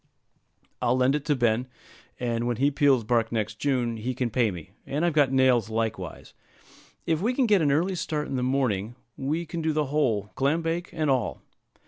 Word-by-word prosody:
I'll 125 +2 +2
lend 130 +1 +3
it 150 -1 -2
to 150 - +2
Ben, 120 0 +1 0.5
and 120 -1 -1
when 120 -2 -1
he 140 +2 +2
peels 140 -4 +3
bark 115 0 +1
next 110 -1 -2
June 125 -5 0
he 125 +4 -3
can 125 -2 -1
pay 120 -1 +2
me; 90 -5 -8
and 150 +5 -1
I've 170 - +1
got 145 -3 +3
nails 130 -5 +3
likewise. 110 0 -4 0.7
If 160 0 0
we 240 +5 0
can 265 - +3
get 205 -5 +4
an 145 -3 +3
early 170 +7 +1
start 155 -4 -2
in - - -4
the 125 - -1
morning, 125 -5 0 0.2
we 155 +6 -2
can 170 +1 -5
do 160 0 0
the 150 0 +1
whole, 110 -9 +1
clam 145 +5 +1
bake 170 +2 -2
and 155 -4 0
all. 120 - -1
130 Hz, 200 wpm, -26 LUFS, 115-155 Hz, 0.7 s, get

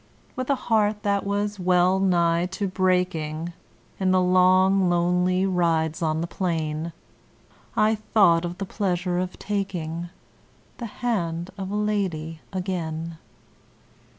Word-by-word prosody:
With 255 +1 -4
a 280 - +4
heart 215 -4 +1
that 200 -1 0
was 205 0 -1
well 180 +1 +3
nigh 175 -2 +2
to 200 0 -1
breaking, 180 -4 0 0.5
In 190 -1 +1
the 185 0 +4
long, 185 +1 +4
lonely 180 +2 +2
rides 165 -4 +1
on 160 -1 0
the - - -1
plain, 165 -3 -2 0.9
I 215 +1 +4
thought 200 -6 +3
of 175 +1 -4
the 195 - -3
pleasure 180 -3 -1
of 185 0 -3
taking 175 -5 -3 0.7
The 235 - -4 0.2
hand 170 -6 -1
of 190 -1 -5
a 205 - -3
lady 185 -7 -1
again. 170 -4 -4
180 Hz, 125 wpm, -25 LUFS, 170-195 Hz, 0.9 s, a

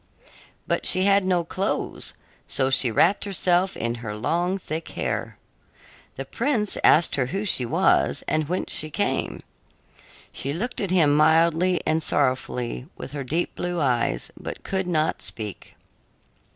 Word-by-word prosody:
But - - -1
she 185 - +4
had 200 0 +4
no 180 -2 +2
clothes, 185 +4 -3 0.3
so 130 0 0
she 130 -1 +3
wrapped 170 - +3
herself 185 -1 +1
in 115 +1 -1
her 105 -2 -5
long, 175 - 0
thick 165 -3 -5
hair. - - -3 0.8
The 135 - -5
prince 225 - +1
asked 165 -1 +5
her 130 -3 +1
who 195 +10 -3
she 130 - +2
was - - +2
and 155 -1 0
whence 180 - -2
she 155 - +1
came. - - -2 0.9
She 140 - -2
looked 240 - -3
at 195 - -2
him 165 -6 +4
mildly 165 +3 +3
and 160 +1 +1
sorrowfully 130 -3 -1
with - - -8
her 145 -1 -4
deep 160 +7 -1
blue 175 -1 -3
eyes, 120 - 0
but - - -8
could 190 -1 -2
not 160 -3 0
speak. 105 -3 -7
160 Hz, 150 wpm, -24 LUFS, 135-185 Hz, 0.9 s, asked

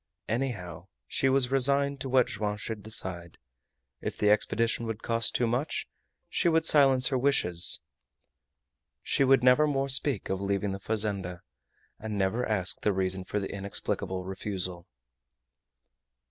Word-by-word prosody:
Anyhow, 95 -9 -4 0.2
she 135 - 0
was 130 -1 +2
resigned 140 +1 +2
to 135 - -4
what 130 -1 +4
Joam 105 -1 -3
should 105 0 -5
decide. 90 -5 -3 0.6
If - - -4
the 105 0 +3
expedition 115 +2 +1
would 110 -1 -5
cost 115 -1 0
too 120 - +2
much, 125 +6 -2 0.4
she 170 - +1
would 160 -1 +2
silence 135 -5 +5
her 130 -2 0
wishes; 90 - +3 1.2
she - - +1
would 135 -1 +4
never 130 +4 +5
more 135 -1 -1
speak 135 -4 0
of 95 0 -2
leaving 100 0 -1
the 95 - -5
fazenda, 100 -4 -2 0.6
and 110 -1 -5
never 100 +5 0
ask 100 -6 +1
the 105 - +1
reason 95 0 -2
for 105 - -2
the 95 - -5
inexplicable 95 -1 -3
refusal. 95 -2 -5
110 Hz, 145 wpm, -28 LUFS, 95-130 Hz, 1.2 s, silence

